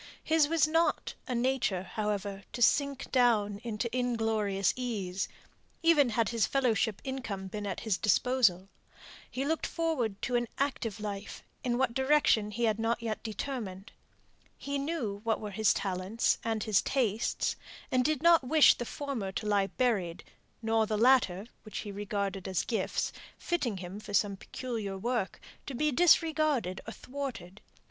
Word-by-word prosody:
His 315 -2 +3
was 315 -1 +3
not 325 +2 +1
a 250 - -2
nature, 240 -7 +1
however, 205 -1 -3
to 240 - -5
sink 280 +2 +2
down 215 -5 +3
into 230 0 -2
inglorious 220 -6 +1
ease, 200 -7 -3 0.6
even 305 -6 +5
had 225 -1 +1
his 230 -2 +1
fellowship 230 -5 +1
income 245 -8 -4
been 205 +2 -5
at 190 - -4
his 215 -5 0
disposal. 210 -4 +3 0.6
He 265 +2 -3
looked 320 +2 0
forward 265 - -1
to 250 - 0
an 240 0 +1
active 240 -6 -2
life; 205 -1 -6 0.2
in 240 -1 0
what 260 -2 +1
direction 265 -5 +3
he 235 +3 -3
had 220 -1 +2
not 230 +1 0
yet 220 -2 -3
determined. 220 -4 -5 0.7
He 280 0 -3
knew 275 -10 -3
what 225 -1 +1
were 210 -1 -6
his 215 +1 +3
talents 195 +3 0
and 225 -2 -1
his 215 -4 +3
tastes; 230 -5 0 0.4
and 255 -1 +3
did 310 +1 0
not 335 -3 +6
wish 300 +4 +6
the 240 - -5
former 250 -8 -4
to 215 - -4
lie 205 -2 +2
buried, 200 -9 -1 0.4
nor 225 0 +2
the 215 -1 -1
latter, 225 -5 +4 0.2
which 215 - -8
he 205 - -5
regarded 200 -1 -3
as 185 -3 -1
gifts, 230 - -1 0.2
fitting 270 - -1
him 185 +2 -7
for 210 -1 -5
some 200 -1 +2
peculiar 215 -2 -5
work, 230 -1 -2 0.3
to 275 - -5
be 300 +4 +1
disregarded 310 - +3
or - - -4
thwarted. 250 -9 -7
225 Hz, 155 wpm, -30 LUFS, 205-265 Hz, 0.7 s, not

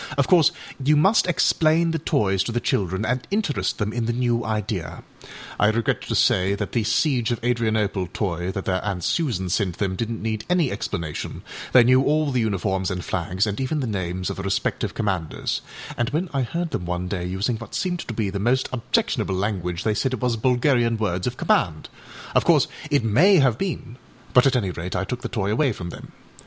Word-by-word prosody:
Of 140 - +3
course 170 -5 +5 0.3
you 150 +2 +4
must 195 +6 +4
explain 165 -1 +3
the 165 - -1
toys 105 - +1
to - - -2
the 120 - 0
children 95 -2 -1
and 125 +2 -1
interest 150 - -1
them 105 +1 -2
in 120 -2 -1
the 120 - 0
new 120 -1 0
idea. 105 -5 -3 0.6
I 105 - +5
regret 110 +1 +1
to - - -1
say 95 +2 +3
that 100 0 -4
the 120 - +1
âSiege 120 +2 +1
of 120 - -1
Adrianopleâ 110 -6 0
toy, 90 -3 -2
that 95 - -5
their 95 -1 0
Aunt 95 -4 -3
Susan 120 - 0
sent 90 -1 -1
them, 95 -2 -1
didnât 115 +3 -3
need 110 -1 -3
any 175 -7 +2
explanation; 85 -7 -4 0.3
they 125 - +7
knew 130 +2 +5
all 150 +1 +1
the 130 - +1
uniforms 95 -3 0
and 90 -2 -4
flags, 95 +3 -1
and 105 +4 -3
even 140 +4 -1
the 135 - -1
names 95 -4 -3
of - - -7
the - - -4
respective 95 0 -1
commanders, 95 -7 -2 0.3
and 120 -3 0
when 165 +6 -1
I 135 - +1
heard 170 +7 -2
them 90 - -3
one 90 +1 -2
day 90 -2 -3
using 100 +6 -1
what 115 - -9
seemed 180 -1 -1
to 115 - -4
be 105 -3 -1
the 100 - -3
most 125 +5 +1
objectionable 115 -5 0
language 90 -3 -2
they 110 - +1
said 130 +5 0
it - - -9
was 125 -2 +2
Bulgarian 120 0 +2
words 90 -4 -1
of - - -3
command; - - +1 0.4
of - - +4
course - - +4 0.2
it 145 -4 +2
may 150 - +5
have 135 -9 +3
been, 140 -10 -4 0.4
but 125 +2 +6
at 135 - +2
any 100 -7 0
rate 90 +1 -5
I 90 - 0
took 125 +2 -4
the - - -4
toy 105 -2 -1
away 135 +4 +2
from 85 -3 -6
them. - - -11
110 Hz, 210 wpm, -23 LUFS, 95-130 Hz, 0.6 s, they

